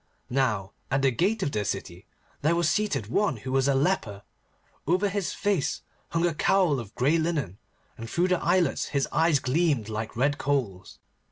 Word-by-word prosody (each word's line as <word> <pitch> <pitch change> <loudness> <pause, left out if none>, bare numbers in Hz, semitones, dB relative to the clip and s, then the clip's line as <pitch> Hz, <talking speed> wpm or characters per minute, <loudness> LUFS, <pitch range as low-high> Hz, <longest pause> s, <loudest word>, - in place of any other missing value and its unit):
Now 110 -8 0 0.2
at 135 +1 0
the 135 - +4
gate 195 - 0
of 140 - -1
the 105 -4 -1
city 95 -2 -5 0.3
there 155 +4 +2
was 170 -1 +1
seated 155 - 0
one 140 - 0
who 130 +5 -6
was 135 0 +2
a 140 - +3
leper. 135 - 0 0.6
Over 185 +5 +2
his 200 -2 -2
face 200 -9 -1 0.3
hung 165 +1 +1
a 170 - +1
cowl 165 -3 +2
of 110 -4 -9
grey 145 +7 +2
linen, 150 - -2 0.4
and 115 0 -7
through 175 +6 +1
the 180 -1 +1
eyelets 180 -6 +2
his 140 -2 -1
eyes 160 -1 +3
gleamed 135 -4 0
like 110 +1 -5
red 140 +3 +1
coals. 120 -10 -2
140 Hz, 180 wpm, -27 LUFS, 115-170 Hz, 0.6 s, the